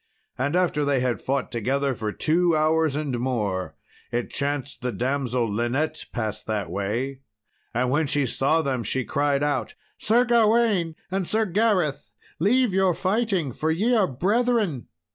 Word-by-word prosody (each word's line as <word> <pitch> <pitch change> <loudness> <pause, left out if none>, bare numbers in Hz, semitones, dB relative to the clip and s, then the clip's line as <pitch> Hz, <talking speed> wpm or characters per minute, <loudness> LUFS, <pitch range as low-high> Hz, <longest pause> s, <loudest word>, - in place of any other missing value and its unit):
And 140 +5 -1
after 175 -5 +2
they 140 -2 +2
had 125 -1 -1
fought 135 0 -2
together 135 +4 0
for 110 -3 -3
two 170 +6 +2
hours 155 -1 +2
and 145 -5 -2
more, 105 -7 -2 0.4
it 120 0 -2
chanced 145 -1 -3
the 125 0 -1
damsel 125 -1 -1
Linet 120 +9 -1
passed 110 -3 -4
that 105 -6 -2
way; 115 +8 -2 0.5
and 125 +1 0
when 150 +2 +2
she 145 0 +1
saw 145 +6 +1
them 130 -4 -1
she 130 +2 -2
cried 145 0 +1
out, 145 0 -1 0.2
"Sir 240 +3 +3
Gawain 220 -7 +3 0.2
and 190 -2 -1
Sir 220 +1 +1
Gareth, 180 - 0 0.3
leave 230 +5 +3
your 190 -2 +3
fighting, 195 - 0
for 155 +6 -2
ye 205 +10 +2
are 215 -5 +4
brethren!" 200 - 0
145 Hz, 155 wpm, -24 LUFS, 125-185 Hz, 0.5 s, are